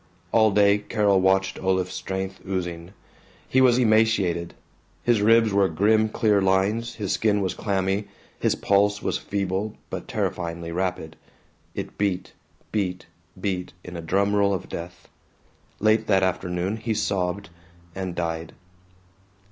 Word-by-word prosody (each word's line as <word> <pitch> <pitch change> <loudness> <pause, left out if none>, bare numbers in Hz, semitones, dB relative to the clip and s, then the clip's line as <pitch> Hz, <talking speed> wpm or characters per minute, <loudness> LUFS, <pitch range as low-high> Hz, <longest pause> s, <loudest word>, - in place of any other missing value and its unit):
All 110 -1 +5
day 100 0 +4
Carol 105 -2 +2
watched 95 0 +2
Olaf's 95 -1 0
strength 95 0 -4
oozing. 90 -2 -4 0.5
He 130 - +3
was 125 -2 +5
emaciated. 110 -7 +2 0.5
His 120 -3 +3
ribs 115 0 +4
were 100 -1 +3
grim 110 +6 +3
clear 105 -3 +2
lines, 100 +5 +1
his 100 -3 -3
skin 105 -2 +2
was 95 -2 -1
clammy, 100 0 -1 0.3
his - - +1
pulse 100 0 +2
was - - -1
feeble 100 +1 -2 0.2
but - - -5
terrifyingly 85 -1 -3
rapid. 85 -3 -3 0.6
It - - -6
beat 100 -3 -1 0.4
beat 90 -4 -2 0.3
beat 90 -3 -3
in 90 - -9
a 85 - -5
drum 100 +5 +1
roll 100 -1 +3
of 95 - -6
death. 85 +1 -8 0.7
Late 110 +1 +3
that 95 -2 +3
afternoon 90 +2 -1
he 110 0 -2
sobbed, 95 -2 -1 0.4
and 95 -2 -4
died. 80 -1 -3
95 Hz, 135 wpm, -24 LUFS, 90-105 Hz, 0.7 s, All